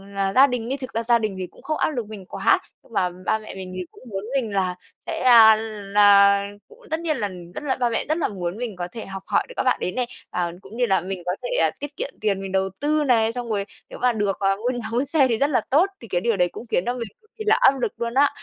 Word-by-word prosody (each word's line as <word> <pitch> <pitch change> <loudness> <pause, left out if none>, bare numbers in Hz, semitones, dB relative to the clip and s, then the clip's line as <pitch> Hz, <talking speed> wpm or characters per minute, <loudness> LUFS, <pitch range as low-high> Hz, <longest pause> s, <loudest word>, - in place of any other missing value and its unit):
là 195 0 0
gia 270 +2 +8
đình, 245 -3 -3
nhưng 270 - -2
thực 260 -2 -8
ra 230 +1 -1
gia 235 0 +4
đình 215 -3 -2
thì 185 - -4
cũng - - -18
không 310 - -2
áp - - +1
lực 245 -7 -3
mình 210 -3 -9
quá, - - +2 0.2
nhưng 230 - -20
mà 180 -3 +1 0.2
ba 220 - +1
mẹ 215 - -10
mình 185 -1 -7
thì 185 - -4
cũng - - -17
muốn 195 -1 -4
mình 230 -6 0
là 185 -2 0 0.3
sẽ, - - -3
a, 230 -3 +8
là 200 -2 +4 0.2
cũng 455 +2 -18
tất 320 - 0
nhiên 315 -4 -1
là, 210 - -1
ừm, 175 -2 -10
rất - - -7
là 270 -3 0
ba 245 -2 +1
mẹ 230 - -1
rất 310 - +1
là 335 - +1
muốn 180 -1 -4
mình 235 -4 -4
có 175 -1 -4
thể 225 - -7
học 195 0 -7
hỏi - - +2
được - - -9
các - - +1
bạn 255 - +2
đấy 180 - -1
này, 250 +4 -2 0.2
à, 175 -1 -2
cũng 195 +4 -12
như 245 - +3
là 190 -5 +2
mình 185 -1 -5
có 180 - 0
thể - - +2
tiết 290 0 -7
kiệm - - -3
tiền, 200 -2 0
mình 195 -1 -6
đầu 190 0 +1
tư 300 +1 +1
này, 230 -5 +3
xong 240 -1 -5
rồi 200 -2 -1 0.2
nếu - - -9
mà 250 -1 +2
được, 205 -3 -1
ờ, 195 0 +2
mua 225 +5 -2
nhà 225 -2 -5
mua 245 +4 +1
xe 285 -1 +4
thì 230 -3 0
rất 280 +4 +2
là 265 - +2
tốt, 320 +9 +4
thì 230 - -10
cái 175 -2 -1
điều 230 -2 +1
đấy 180 -1 +2
cũng 240 - -9
khiến 175 - +1
cho 245 - 0
mình 240 -2 -5
cực 435 - -30
kỳ 435 - -5
là 435 +2 +5
áp 275 - +5
lực 235 - 0
luôn 235 0 -3
á. 280 +3 +5
225 Hz, 305 wpm, -23 LUFS, 195-255 Hz, 0.3 s, gia